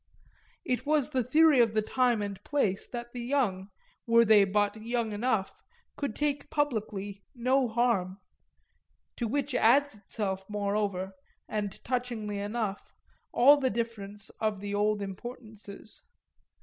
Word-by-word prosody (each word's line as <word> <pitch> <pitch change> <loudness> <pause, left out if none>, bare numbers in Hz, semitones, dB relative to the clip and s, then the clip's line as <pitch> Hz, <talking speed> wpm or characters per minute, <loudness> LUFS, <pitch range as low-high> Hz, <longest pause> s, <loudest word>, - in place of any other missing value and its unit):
It 255 -4 -1
was 295 -1 +1
the 260 -3 +1
theory 305 +2 +5
of 230 -2 +3
the 215 - +2
time 245 -2 +1
and 200 -1 -6
place 215 -10 0
that 240 -1 -7
the 245 - -5
young, 235 -7 0 0.4
were 230 0 +6
they 210 -2 +6
but 205 +2 0
young 230 -1 -1
enough, 210 -2 -1 0.3
could 280 -6 -3
take 290 -1 -1
publicly 210 -8 -2
no 255 +2 +2
harm; 220 -5 +1 1.0
to 235 - -1
which 280 +3 -1
adds 270 +5 +4
itself 195 -2 -4
moreover, 200 -2 -1 0.3
and 205 -2 -3
touchingly 235 -5 -2
enough, 205 -1 -3 0.4
all 280 +4 +7
the 265 -2 +1
difference 210 -3 -4
of 215 -2 -1
the 205 0 -5
old 205 0 +1
importances. 215 0 -9
220 Hz, 135 wpm, -29 LUFS, 205-250 Hz, 1.0 s, all